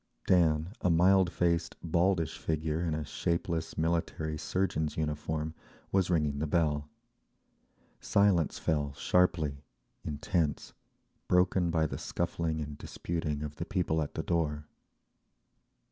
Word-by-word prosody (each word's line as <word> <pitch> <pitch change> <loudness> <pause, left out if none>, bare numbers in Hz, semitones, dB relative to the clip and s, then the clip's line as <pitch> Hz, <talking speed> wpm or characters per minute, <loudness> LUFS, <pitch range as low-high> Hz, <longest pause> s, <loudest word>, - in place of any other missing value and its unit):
Dan, 80 0 +3
a 90 - +2
mild 90 +2 +5
faced, 85 -2 0
baldish 85 -1 +1
figure 80 +1 -1
in 80 -3 0
a 80 -1 -3
shapeless 85 +1 -2
military 80 -1 -1
surgeon's 80 -2 -1
uniform, 75 0 -2 0.4
was 95 -2 +2
ringing 75 -5 +1
the 80 - -1
bell. 75 -2 +1 1.1
Silence 100 -6 +2
fell 75 -3 0
sharply, 75 -3 +1 0.4
intense, 75 0 -1 0.5
broken 90 -1 +3
by 80 -1 +2
the - - -3
scuffling 80 -2 -2
and 75 -1 -6
disputing 75 -3 -3
of 75 -1 -6
the 85 - -3
people 85 -4 0
at 75 - -4
the 80 - -2
door…. 75 -3 -1
80 Hz, 120 wpm, -31 LUFS, 75-85 Hz, 1.1 s, mild